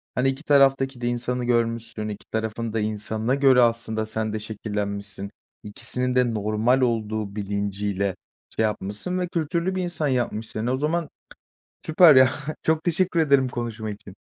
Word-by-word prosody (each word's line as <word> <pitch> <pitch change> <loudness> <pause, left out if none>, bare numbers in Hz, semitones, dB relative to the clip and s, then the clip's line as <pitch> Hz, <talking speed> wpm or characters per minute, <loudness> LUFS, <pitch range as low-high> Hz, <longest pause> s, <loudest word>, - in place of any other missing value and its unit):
hani 125 +1 +2
iki 135 +4 -5
taraftaki 135 -3 +3
de 120 - -1
insanı 120 +1 -2
görmüşsün, 115 -2 -1
iki 105 - -8
tarafın 110 0 -3
da 110 - 0
insanına 110 +3 -1
göre 135 -3 +5
aslında 115 -2 +1
sen 110 0 -3
de 110 - -2
şekillenmişsin. 100 -2 -5 0.3
İkisinin 125 +4 -3
de 125 -2 +2
normal 110 +5 +1
olduğu 110 -4 -1
bilinciyle 100 -1 -2 0.4
şey 110 - +1
yapmışsın 105 - -2
ve 180 - -1
kültürlü 170 +2 -1
bir 185 - -1
insan 170 -4 -2
yapmış 120 -4 -1
seni. 110 +4 -3
O 130 - 0
zaman 155 +2 -1 0.8
süper, 160 -2 +7
ya. 130 0 +7 0.3
Çok 160 0 +1
teşekkür 175 0 +1
ederim 140 -4 +4
konuşma 115 -3 -4
için. 100 -1 -10
115 Hz, 155 wpm, -24 LUFS, 105-135 Hz, 0.8 s, süper